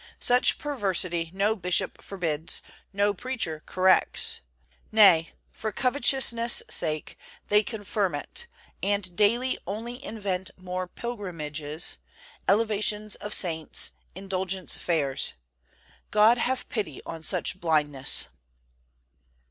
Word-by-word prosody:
Such 245 +1 +4
perversity 185 - 0
no 200 +3 +1
bishop 180 -1 -1
forbids, 165 -5 -2 0.3
no 200 +1 +2
preacher 215 -9 -3
corrects; 185 0 +3 0.5
nay, 195 -7 +6 0.2
for 220 - -4
covetousness' 250 -2 +2
sake 155 -2 -2 0.3
they 210 0 +5
confirm 205 -5 -2
it 470 - -6 0.3
and 200 -2 0
daily 235 +6 +2
only 230 +5 -5
invent 195 -3 -3
more 185 0 -4
pilgrimages, 160 - -5 0.5
elevations 215 0 +1
of 210 - -7
saints, 160 -6 +3 0.2
indulgence 190 -1 -2
fairs. 145 -6 0 0.8
God 215 +3 +5
have 260 +2 -1
pity 190 - -4
on 165 -1 -6
such 185 +4 0
blindness. 145 - +2
195 Hz, 100 wpm, -27 LUFS, 170-215 Hz, 0.8 s, nay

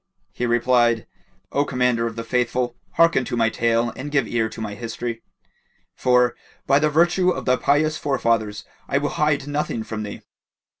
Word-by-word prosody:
He 125 - -2
replied, 120 -1 +2 0.5
"O 140 - +2
Commander 125 -4 +1
of 115 - -6
the 115 - -4
Faithful, 125 +1 -1 0.2
hearken 165 -6 +4
to 120 - -3
my 115 -1 +2
tale 115 +1 +1
and 135 +3 -6
give 135 -6 +1
ear 115 -2 0
to - - -10
my 110 -2 -4
history; 115 +1 -5 0.7
for, 125 -1 +2 0.3
by 140 +1 +4
the 155 0 +2
virtue 175 +4 +3
of 180 - -2
thy 125 0 +3
pious 155 +3 +2
forefathers, 115 -6 0 0.2
I 140 - +1
will 145 +1 0
hide 150 -2 0
nothing 145 -6 -2
from 110 -1 -5
thee!" 105 -1 -7
125 Hz, 170 wpm, -22 LUFS, 115-145 Hz, 0.7 s, hearken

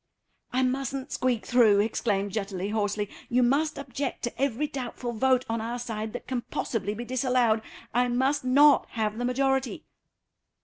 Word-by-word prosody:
"I 255 +1 +1
mustn't 270 +1 -2
squeak 250 -3 0
through," 230 -5 +5
exclaimed 205 -2 0
Jutterly, 195 -2 -3
hoarsely. 210 -1 -1 0.2
"You 250 +1 +3
must 290 +5 +2
object 275 0 -4
to 240 +1 -4
every 275 +1 +1
doubtful 250 -3 -5
vote 255 +2 +2
on 225 0 -2
our 235 +2 -3
side 220 -3 -4
that 245 - -6
can 255 -2 -2
possibly 210 -3 -2
be 240 +3 -5
disallowed. 250 -3 +2 0.3
I 245 +2 +3
must 260 +4 +1
not 280 +3 +5
have 220 0 -1
the 245 - -1
majority." 265 +1 0
245 Hz, 160 wpm, -27 LUFS, 220-260 Hz, 0.3 s, through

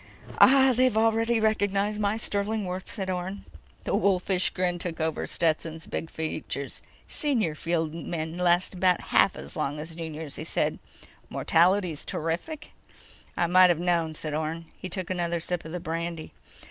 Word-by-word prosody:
"Ah, 265 -1 +7
they've 255 -2 +3
already 225 +1 +3
recognized 210 -1 +1
my 205 +1 +1
sterling 210 0 -1
worth," 180 +1 -5
said 195 -3 -4
Orne. 185 +2 -4 0.4
The - - 0
wolfish 190 -1 +2
grin 180 -1 -1
took 170 -1 -4
over 160 -1 -1
Stetson's 160 -1 -1
big 165 - -4
features. 155 -3 -4 0.3
"Senior 235 - 0
field 165 0 -1
men 160 0 -4
last 175 +1 +2
about 180 -1 +3
half - - +5
as 70 +2 -8
long 145 +2 -2
as 160 +2 -6
the 165 - -10
juniors," 160 -3 -5
he - - -5
said. - - -1 0.5
"Mortality's 175 -2 +2
terrific?" 175 - -4 0.7
"I 175 - +3
might've 180 -1 +6
known," 170 -3 0
said 155 -1 -1
Orne. 160 +2 -3
He 185 - -7
took 185 0 -4
another 170 -2 -1
sip 175 0 -3
of 160 - -7
the 180 - -3
brandy. 165 0 -4
175 Hz, 160 wpm, -27 LUFS, 160-200 Hz, 0.7 s, Ah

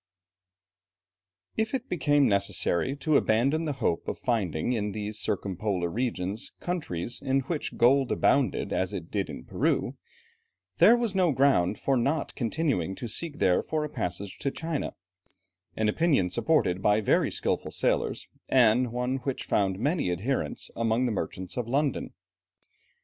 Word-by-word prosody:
If 220 +4 0
it 260 -1 -4
became 145 -4 +2
necessary 100 +3 +1
to 145 +1 +2
abandon 135 +9 +2
the 150 - -1
hope 85 - 0
of - - -3
finding 110 -4 -1
in 105 -3 -2
these 105 0 -3
circumpolar 95 -2 -1
regions 110 -2 -3
countries 120 - -4
in 135 +1 +1
which 150 +3 -4
gold 130 +2 +4
abounded 140 - +1
as - - -1
it - - -6
did - - -1
in - - -7
Peru, - - 0 0.8
this 240 - +7
was 235 -4 -1
no 185 -4 +3
ground 130 -9 +3
for 135 - 0
not 140 +6 0
continuing 115 - -1
to 120 - -6
seek 150 +7 -1
there 90 -8 +3
for 155 -1 -2
a - - -6
passage 95 -6 -4
to 140 - 0
China; 160 +1 -4 0.8
an 110 - 0
opinion 130 - +2
supported 95 - +1
by 105 +1 +3
very 110 - +2
skilful - - -1
sailors, - - -1 0.2
and 125 -1 +4
one 125 +2 -1
which 135 0 -4
found 95 -2 +1
many 140 - 0
adherents 110 +10 -2
among 115 +2 +1
the 120 - 0
merchants 95 -2 -4
of 120 -2 -2
London. 140 +2 0
125 Hz, 150 wpm, -27 LUFS, 100-145 Hz, 0.8 s, this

